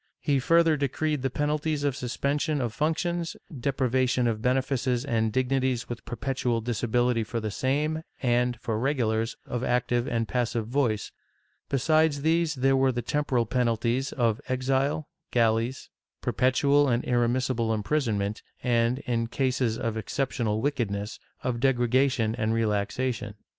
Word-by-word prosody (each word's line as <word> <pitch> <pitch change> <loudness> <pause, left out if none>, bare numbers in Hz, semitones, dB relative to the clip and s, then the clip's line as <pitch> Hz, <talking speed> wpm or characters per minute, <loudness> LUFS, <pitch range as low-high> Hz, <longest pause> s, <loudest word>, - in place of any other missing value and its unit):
He 145 -3 +1
further 165 +3 +4
decreed 145 +1 -1
the 135 - 0
penalties 150 +2 -1
of 140 -3 +1
suspension 140 +5 -1
of 120 -4 -2
func 155 +1 +1
tions, 170 -1 -2 0.2
deprivation 130 -1 +1
of 110 -2 0
benefices 130 0 0
and 110 -4 +1
dignities 130 0 0
with 120 -1 -6
perpetual 125 -1 -1
disa 120 +1 -2
bility 120 0 +2
for 115 +2 -3
the 110 -1 -3
same 150 +7 0 0.2
and, 125 -1 +1
for 110 -3 -2
regulars, 115 -4 0
of 125 0 -3
active 120 0 +1
and 115 -1 -1
passive 120 -2 -1
voice; 120 -3 0 0.6
besides 150 +1 +2
these 165 0 +2
there 135 +1 +3
were 135 0 +3
the 120 -1 -3
temporal 130 -3 0
penalties 120 +1 0
of 115 -4 0
exile, 135 +4 0 0.2
galleys, 115 +2 +1 0.3
perpetual 140 +2 +3
and 120 0 +1
irremissible 120 -1 +1
imprisonment 110 -3 -1 0.2
and, 120 0 +2
in 115 -1 0
cases 125 -2 0
of 115 -1 -2
excep 135 +4 -2
tional 110 -3 -1
wickedness, 110 -7 -2 0.2
of 120 -2 -1
degradation 125 -2 +2
and 115 -1 0
relaxation. 105 0 -1
125 Hz, 140 wpm, -27 LUFS, 115-140 Hz, 0.6 s, further